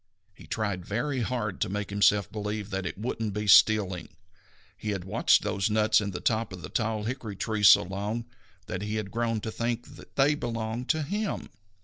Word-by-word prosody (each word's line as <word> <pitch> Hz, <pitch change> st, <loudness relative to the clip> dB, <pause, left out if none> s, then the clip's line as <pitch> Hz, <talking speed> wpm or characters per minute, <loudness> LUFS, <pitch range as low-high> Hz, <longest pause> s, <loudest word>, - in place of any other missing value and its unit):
He -, -, -15 dB
tried 100 Hz, -5 st, -2 dB
very 130 Hz, +8 st, -2 dB
hard 110 Hz, -5 st, -2 dB
to 105 Hz, -, +1 dB
make 105 Hz, +1 st, -3 dB
himself 100 Hz, 0 st, +3 dB
believe 105 Hz, -1 st, -4 dB
that 95 Hz, -1 st, -2 dB
it -, -, -6 dB
wouldn't 110 Hz, -1 st, -3 dB
be 105 Hz, 0 st, -2 dB
stealing. 100 Hz, -3 st, +5 dB, 0.7 s
He 105 Hz, -, -5 dB
had 95 Hz, -3 st, -4 dB
watched 105 Hz, +5 st, +3 dB
those 100 Hz, 0 st, 0 dB
nuts 110 Hz, 0 st, +3 dB
in 100 Hz, -, -2 dB
the 90 Hz, -2 st, -5 dB
top 110 Hz, +4 st, 0 dB
of 90 Hz, -3 st, -8 dB
the 75 Hz, -, -6 dB
tall 110 Hz, -2 st, -1 dB
hickory 115 Hz, -3 st, -4 dB
tree 110 Hz, +1 st, -2 dB
so 100 Hz, -, +8 dB
long 100 Hz, +5 st, -3 dB, 0.4 s
that 90 Hz, -, -4 dB
he 105 Hz, +1 st, -3 dB
had 105 Hz, -2 st, -3 dB
grown 115 Hz, -2 st, -1 dB
to 110 Hz, -, -4 dB
think 120 Hz, +5 st, -3 dB
that -, -, -15 dB
they 140 Hz, +2 st, +4 dB
belonged 115 Hz, -2 st, -4 dB
to 160 Hz, -1 st, +2 dB
him. 205 Hz, +7 st, -3 dB
110 Hz, 200 wpm, -28 LUFS, 100-115 Hz, 0.7 s, so